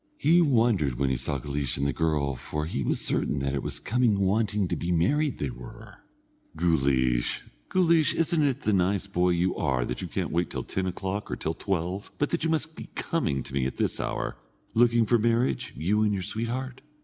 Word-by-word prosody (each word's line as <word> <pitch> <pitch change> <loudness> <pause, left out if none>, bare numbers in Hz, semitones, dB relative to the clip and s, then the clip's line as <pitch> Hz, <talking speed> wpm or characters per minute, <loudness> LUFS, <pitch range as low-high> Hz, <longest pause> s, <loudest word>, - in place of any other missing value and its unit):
He 170 +3 +4
wondered 115 - +2
when 70 0 +1
he - - +1
saw 70 +3 -2
Guleesh 70 0 -2
and 70 - 0
the 70 - +1
girl, 75 -2 0
for 75 +4 -4
he 80 - -3
was - - 0
certain 75 - 0
that 70 0 -1
it 70 - -1
was - - -4
coming 120 -2 +2
wanting 105 0 +1
to - - -1
be 85 - -2
married 135 - +2
they 70 -3 -2
were. - - -11 0.6
"Guleesh, 65 -7 +2 0.3
Guleesh, 170 -4 +3
isn't 165 0 +1
it 140 -4 +1
the 110 - +1
nice 95 +1 +1
boy 90 -2 +1
you 90 +1 +1
are 65 -5 0
that 60 - -4
you - - -4
can't - - -3
wait 85 0 0
till - - -4
ten 95 0 -2
o'clock 95 +3 -4
or - - -2
till 80 - -2
twelve, 95 +2 -3
but 145 - 0
that 170 - 0
you 165 - +1
must 160 0 -1
be - - -9
coming 75 - -1
to - - -9
me 65 -1 +1
at - - -7
this - - -1
hour, - - -3 0.4
looking 120 0 +4
for 120 +2 +3
marriage, 115 +3 +1
you 100 +7 +1
and 105 -1 +2
your 95 -2 -1
sweetheart? 120 +6 -2
95 Hz, 210 wpm, -27 LUFS, 70-120 Hz, 0.6 s, He